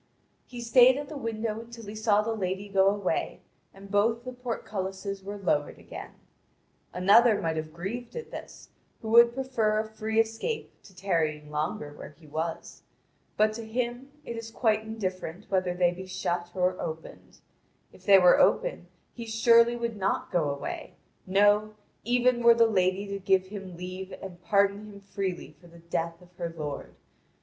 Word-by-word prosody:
He 245 -1 -8
stayed 250 +2 +6
at 290 -1 -5
the 310 - -7
window 225 -4 -3
until 230 0 -10
he 205 - -7
saw 215 -1 +2
the 225 +1 -1
lady 190 -1 -3
go 195 -1 +3
away, 200 -1 -1 0.3
and 195 0 -14
both 225 +3 +2
the 255 0 -6
portcullises 195 -5 -5
were 200 +1 -6
lowered 150 -7 0
again. - - -10 0.8
Another 205 +4 +5
might 165 -1 -1
have 155 0 -4
grieved 195 +9 -6
at 475 - -7
this, - - -10 0.3
who 220 - -4
would 235 +1 +7
prefer 240 -5 0
a 215 0 -1
free 220 0 -2
escape 225 - -1
to 190 - -16
tarrying 155 -6 -1
longer 150 -1 -3
where 150 0 -11
he 160 - -17
was. 160 +2 -5 0.6
But 215 +1 +3
to 230 +1 -6
him 240 +3 -3 0.2
it 235 - -5
is 230 0 -6
quite 220 -2 +1
indifferent 195 -4 -5
whether 185 -2 +1
they 175 -1 +3
be 185 +1 -8
shut 175 -1 -2
or 185 0 0
opened. 160 0 -8 0.6
If - - -18
they 200 -1 +7
were 180 -1 +6
open - - +2 0.3
he 235 -1 -8
surely 230 +1 +5
would 235 -2 -3
not 195 -1 -1
go 165 -5 +1
away, 140 0 -5 0.3
no, 205 +2 +3 0.3
even 245 +1 +2
were 235 0 +7
the 230 0 +5
lady 190 -2 +1
to 200 0 -3
give 190 -1 +2
him 190 -3 -8
leave 185 +2 -7
and 180 -2 -9
pardon 200 +3 +2
him 200 -1 -11
freely 190 -6 -4
for 175 - -16
the 170 0 -16
death 170 0 -3
of 180 0 -21
her 170 -2 -3
lord. 150 -2 -6
200 Hz, 175 wpm, -28 LUFS, 180-230 Hz, 0.8 s, would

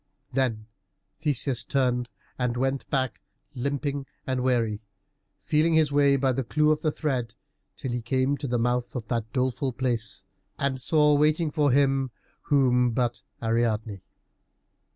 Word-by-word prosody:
Then 120 -5 0 0.5
Theseus 140 -4 +1
turned 125 -2 0 0.3
and 125 -1 0
went 135 +1 -1
back, 130 -3 -1 0.3
limping 140 +1 -2 0.2
and 130 -1 -1
weary, 115 -4 +1 0.6
feeling 160 +2 +2
his 155 -2 +3
way 140 -1 +4
by 135 -1 +2
the 130 +1 -1
clue 150 +5 +2
of 155 0 +1
thread, 130 -7 -2 0.4
till 130 - -4
he 120 0 -2
came 130 +4 +1
to 145 - -4
the 120 -1 0
mouth 120 +2 0
of 115 -4 -4
that 115 -2 -2
doleful 130 +1 -1
place, 120 -4 -2 0.3
and 135 -2 -1
saw 150 +2 +4
waiting 150 +2 +2
for 150 -2 +2
him 135 0 +2 0.3
whom 125 -4 +3
but 120 -1 -1 0.2
Ariadne? 115 -3 0
130 Hz, 140 wpm, -26 LUFS, 120-140 Hz, 0.6 s, way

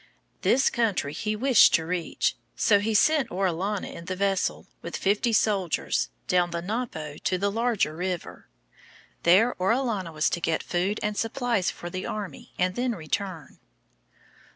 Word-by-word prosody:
This 270 +2 +3
country 205 -11 0
he 215 +6 -2
wished 255 +1 +6
to 160 - 0
reach. 175 0 -1 0.2
So 205 -2 +4
he 215 +2 -1
sent 305 +5 +4
Orellana 190 +2 -1
in 170 - -9
the 185 - -3
vessel, 195 0 0 0.2
with - - -5
fifty 205 +4 +1
soldiers, 200 - +1 0.2
down 180 -1 +2
the 170 0 -4
Napo 180 -9 -4
to 185 - 0
the 200 +2 0
larger 225 -8 0
river. 180 0 -4 0.7
There 200 +8 +5
Orellana 210 -3 0
was 155 -1 +1
to 175 - -2
get 165 -1 0
food 185 +4 -1
and 210 0 -1
supplies 230 -3 0
for 175 - -7
the 185 +1 -4
army 200 -9 -6
and 180 0 +1
then 245 +3 -1
return. 170 -1 -4
195 Hz, 150 wpm, -26 LUFS, 175-220 Hz, 0.7 s, wished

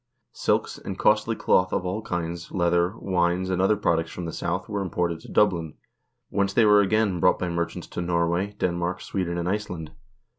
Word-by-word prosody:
Silks, - - 0
and - - -6
costly - - +2
cloth 90 0 +2
of 90 - -1
all 95 +4 -2
kinds, 85 -3 -4
leather, 85 +2 +1
wines, 90 -1 0
and 95 0 +1
other 105 +2 +3
products 85 -4 +1
from 90 - -6
the 80 - -5
South 90 +2 -2
were 105 -2 -2
imported 85 -2 -1
to - - -13
Dublin, 85 -7 +2 0.6
whence 100 0 0
they 115 - +4
were 105 -1 +6
again 100 -2 +1
brought 90 - +4
by 90 - -2
merchants 85 0 -3
to - - -5
Norway, 85 +3 0
Denmark, 90 +1 -1
Sweden, 90 -3 -3
and 85 0 -2
Iceland. 90 -6 -3
90 Hz, 185 wpm, -25 LUFS, 85-95 Hz, 0.6 s, were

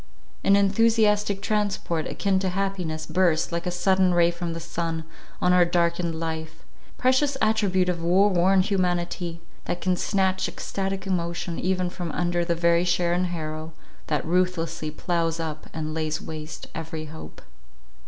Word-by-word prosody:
An 195 - +5
enthusiastic 210 0 +3
transport, 200 -6 -1
akin 195 -2 0
to 190 -1 0
happiness, 180 -4 -2
burst, 175 -3 +2
like 170 +1 -2
a - - +2
sudden 185 0 +2
ray 170 0 +5
from 170 -1 -4
the 165 - -5
sun, 165 -1 -3 0.4
on 180 - +3
our 180 -1 +6
darkened 170 -1 0
life. 160 -1 -5 0.3
Precious 270 +2 +2
attribute 205 -5 +2
of 175 -2 -1
woe 180 +4 +4
worn 190 0 +4
humanity! 175 -3 -1 0.2
that 175 - -2
can 185 +1 +1
snatch 190 0 +1
extatic 195 0 -3
emotion, 170 -2 -2
even 185 0 0
from 175 -3 -4
under 175 0 0
the 170 0 0
very 170 0 +3
share 175 -1 +1
and 180 +1 +1
harrow, 160 -2 -5 0.3
that 150 -2 -1
ruthlessly 170 -2 0
ploughs 165 +1 -1
up 155 -2 -5
and 155 -1 -4
lays 155 -1 -1
waste 155 0 -7
every 160 -1 -5
hope. 155 +1 -10
175 Hz, 155 wpm, -25 LUFS, 165-190 Hz, 0.4 s, our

